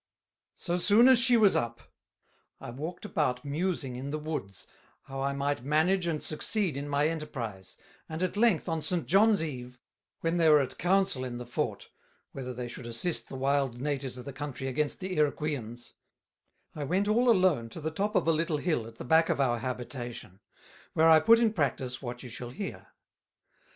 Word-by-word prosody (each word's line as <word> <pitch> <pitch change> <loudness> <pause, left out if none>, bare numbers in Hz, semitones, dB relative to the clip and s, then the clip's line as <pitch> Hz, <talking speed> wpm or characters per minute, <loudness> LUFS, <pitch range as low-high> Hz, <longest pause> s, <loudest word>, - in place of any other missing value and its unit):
So 175 -1 -1
soon 210 +7 +5
as 260 -2 +7
she 245 -1 +5
was 210 -3 +5
up, 120 0 -1 0.8
I - - -8
walked 160 - -6
about 150 -10 -1
musing 145 -3 -2
in 130 +3 -5
the 150 - -2
Woods, 150 - -5 0.4
how 135 0 -6
I 140 +1 0
might 140 -2 -2
manage 165 +6 +2
and 155 -3 -2
succeed 180 +1 0
in 140 +1 -4
my 145 +1 +2
Enterprise; 130 - -5 0.3
and 160 +3 -3
at 185 - -1
length 215 -6 +2
on 165 -2 -1
St. 175 0 -1
John's 200 0 +4
Eve, 125 -4 -7 0.4
when 165 +1 0
they 165 -2 +4
were 150 -1 +7
at 135 -2 -3
Council 190 -6 +2
in 125 -2 -5
the 125 - -7
Fort, 120 - -3 0.4
whether 130 -2 -6
they 125 0 -5
should 120 0 -8
assist 120 +9 -2
the - - -7
Wild 135 -2 0
Natives 135 -2 -3
of 125 - -9
the 140 - -7
Country 135 -1 -6
against 145 +5 -1
the 185 0 -3
Iroqueans; 140 -6 -2 0.8
I 150 - -5
went 185 +8 0
all 240 +4 +3
alone 180 - +3
to 165 - -9
the 160 0 -3
top 205 +6 -2
of - - +2
a - - +5
little 165 0 0
Hill 145 -8 -1
at 115 - -12
the - - -8
back 160 +5 +4
of - - 0
our 120 -4 +2
Habitation, 120 -5 -6 0.5
where 160 +1 +5
I 160 -1 +8
put 225 +9 +6
in 230 -2 +2
Practice 135 - -1
what 120 -1 -6
you 125 - -8
shall 120 +1 -7
hear. 165 +11 -7
150 Hz, 190 wpm, -29 LUFS, 125-175 Hz, 0.8 s, I